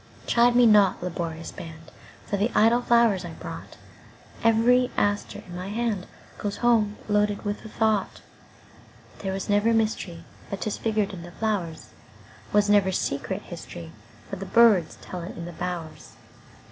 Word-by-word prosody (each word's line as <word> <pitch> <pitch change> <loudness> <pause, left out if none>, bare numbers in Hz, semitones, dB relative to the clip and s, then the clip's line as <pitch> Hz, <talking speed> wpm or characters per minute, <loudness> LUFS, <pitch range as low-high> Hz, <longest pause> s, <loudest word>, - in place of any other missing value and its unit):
Chide 240 +1 +4
me 245 0 +6
not, 205 -5 +5
laborious 165 -2 -4
band, 160 -1 -10 0.3
For - - -2
the 205 +4 +1
idle 230 +3 +5
flowers 235 -6 +3
I 170 -2 -7
brought; - - -9 0.7
Every 240 +3 +4
aster 205 0 -1
in 175 -2 -10
my 180 +2 -5
handGoes 210 -2 -4
home 220 -4 +3
loaded 210 -1 +1
with 205 0 -3
a - - -7
thought. 215 -3 0 1.0
There 195 - -3
was 195 0 -4
never 205 +3 +3
mysteryBut 200 -3 -3
'tis 215 - -3
figured 215 -2 0
in 180 - -7
the 175 - -9
flowers; 190 -8 -3 0.6
SWas 205 0 +3
never 205 -2 +4
secret - - -2
historyBut - - -10
birds 220 -8 +5
tell 180 - -6
it 170 - -8
in 170 - -6
the 175 - -8
bowers. 175 -2 -6
205 Hz, 145 wpm, -25 LUFS, 180-225 Hz, 1.0 s, me